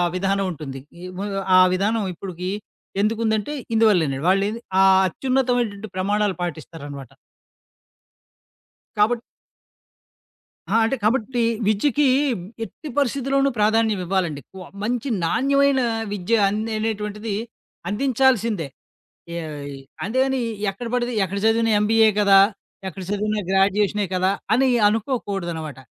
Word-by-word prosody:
విధానం 195 +1 0
ఉంటుంది. 140 -5 -7 0.3
ఆ - - -9
ము 200 - -2 0.3
ఆ - - +8
విధానం 210 +3 0
ఇప్పటికి, 180 0 -6 0.5
ఎందుకుందంటే 220 +3 0 0.2
ఇందువల్లనండి. 170 -11 +3
వాళ్ళేవి 200 +4 +1 0.2
ఆ - - +6 0.3
అత్యున్నతమైనటువంటి 245 -3 -1
ప్రమాణాలు 205 +1 0
పాటిస్తారనమాట. 145 -5 -6 1.9
కాబట్ 230 +3 +3 1.5
ఆ! - - +1
అంటే 230 +4 0
కాబట్టి 240 +1 +1 0.3
విద్యకి 280 +7 +2 0.6
ఎట్టి 290 - -10
పరిస్థితిలోనూ 275 +1 +1
ప్రాధాన్యం 215 -1 +2
ఇవ్వాలండి 175 -6 -1
ఎక్కువ. 190 +5 -12 0.2
మంచి 240 +4 -2 0.2
నాణ్యమైన 275 +6 +2 0.3
విద్య 205 +3 -1
అన్ 210 +2 -2 0.2
అనేటువంటిది 210 -1 -3 0.5
అందించాల్సిందే. 230 - +1 0.7
యాయి 150 -4 -6 0.3
అంతేగాని 260 +4 +1 0.3
ఎక్కడ 195 +5 -6
బడితే 245 0 0
ఎక్కడ 195 +2 -3
చదివినా 225 0 +3
ఎంబీఏ 220 +1 +4
కదా! 200 -1 +6 0.5
ఎక్కడ 190 0 -7
చదివినా 210 +1 -1
గ్రాడ్యుయేషనే 200 +1 +2
గదా! 185 +1 +2 0.2
అని 265 +3 +3 0.2
అనుకోకూడదనమాట. 195 - -2
210 Hz, 100 wpm, -22 LUFS, 190-230 Hz, 1.9 s, ఆ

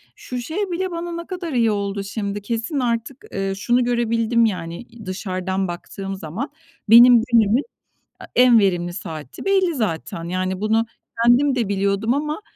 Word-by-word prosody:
Şu 250 - -7
şey 315 +9 -6
bile 370 +2 -2
bana 340 0 -4
ne 340 0 -6
kadar 355 -4 -5
iyi 230 -3 +3
oldu, 200 -1 -2
şimdi, 200 0 -4
kesin 230 - -2
artık, 240 +1 -2
eee, 195 0 -1
şunu 240 +5 +1
görebildim 235 -1 +2
yani, 170 -5 -3
i 235 -2 -14
dışarıdan 185 0 -2
baktığım 195 +3 -6
zaman 190 - -5 0.4
benim 240 +1 +9
günümün 230 +2 +4 0.6
a - - -9
en 245 -2 +7
verimli 175 -3 +1
saati 155 -6 -8
belli 380 -4 +2
zaten. 170 - -3
Yani, 185 +2 -2
bunu 220 +2 +2 0.4
kendim 260 +3 +4
de 235 -4 0
biliyordum 200 +3 0
ama 300 +5 -2
225 Hz, 160 wpm, -21 LUFS, 195-250 Hz, 0.6 s, benim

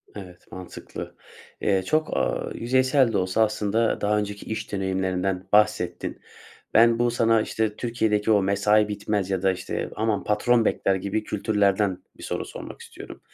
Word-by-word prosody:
Evet, 90 -3 -11
mantıklı. 90 -1 -9 0.5
Eee, 95 -2 +1
çok, 155 +10 0
aaa, - - -1
yüzeysel 130 0 +2
de - - +2
olsa 95 +4 +2
aslında 110 +1 0
daha 105 +1 +2
önceki 105 -1 -4
iş 110 -1 -5
deneyimlerinden 95 -1 -1
bahsettin. 105 -4 +1 0.5
Ben 115 +1 +5
bu 120 0 +2
sana, 115 -1 +3
işte, 110 -1 -2
Türkiye'deki 110 -3 0
o 105 -2 +4
mesai 105 +2 +3
bitmez 105 -2 -2
ya 95 -2 -1
da, 95 -1 +3
işte, 90 0 -4
aman 110 -1 0
patron 115 +3 +2
bekler 95 - +1
gibi 100 +3 -2
kültürlerden 100 -2 +1 0.2
bir - - -12
soru - - -3
sormak - - -9
istiyorum. - - -11
105 Hz, 155 wpm, -24 LUFS, 95-110 Hz, 0.5 s, Ben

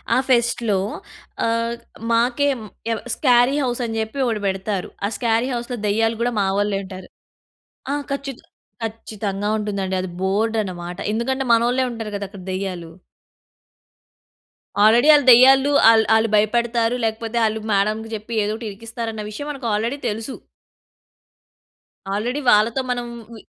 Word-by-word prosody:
ఆ - - +4
ఫెస్ట్‌లో 235 -4 +2 0.7
ఆహ్, 230 +1 0 0.4
మాకే 240 +4 +2 0.4
ఎం 225 - -1 0.2
స్కేరీ 250 0 +4
హౌస్ 245 -1 -2
అని 225 -1 -4
చెప్పి 220 +5 -4
ఒకటి 225 -4 -1
పెడతారు. 195 0 -2 0.2
ఆ - - +2
స్కేరీ 230 0 +1
హౌస్‌లో 240 +1 -4
దెయ్యాలు 225 +2 +1
గూడా 240 +1 +1
మా - - +1
వాళ్ళే 205 -1 0
ఉంటారు. 185 -1 -10 0.9
ఆ - - +1 0.2
ఖచ్చిత 275 -2 -5 0.4
ఖచ్చితంగా 210 -2 -4
ఉంటుందండి 200 -3 -2
అది 185 - -4
బోర్డ్ 215 +4 0
అన్నమాట. 175 -2 -7
ఎందుకంటే 265 +4 -1
మనోళ్ళే 240 +3 +3
ఉంటారు 225 -2 -6
కదా 200 - -4
అక్కడ 195 -1 -11
దెయ్యాలు. 185 -3 -4 1.9
ఆల్రెడీ 230 +6 +5
ఆళ్ళు 290 -2 +4
దెయ్యాలు. 265 +3 +7 0.2
అల్ 220 -1 +4
ఆళ్ళు 220 0 +2
భయపడతారు, 230 +2 +1
లేకపోతే 225 +1 -3
ఆళ్ళు 220 0 -1
మేడంకి 215 +3 0
చెప్పి 215 +2 -7
ఏదో 210 +1 -1
ఒకటి 225 -1 -6
ఇరికిస్తారన్న 225 +1 -6
విషయం 290 +8 -6
మనకు 270 -4 -6
ఆల్రెడీ 230 +6 -1
తెలుసు. 225 +5 -5 1.8
ఆల్రెడీ 240 +8 -2
వాళ్ళతో 225 +5 +4
మనం. 245 -1 -2 0.3
ఉయ్ 220 - -13
225 Hz, 135 wpm, -21 LUFS, 210-240 Hz, 1.9 s, దెయ్యాలు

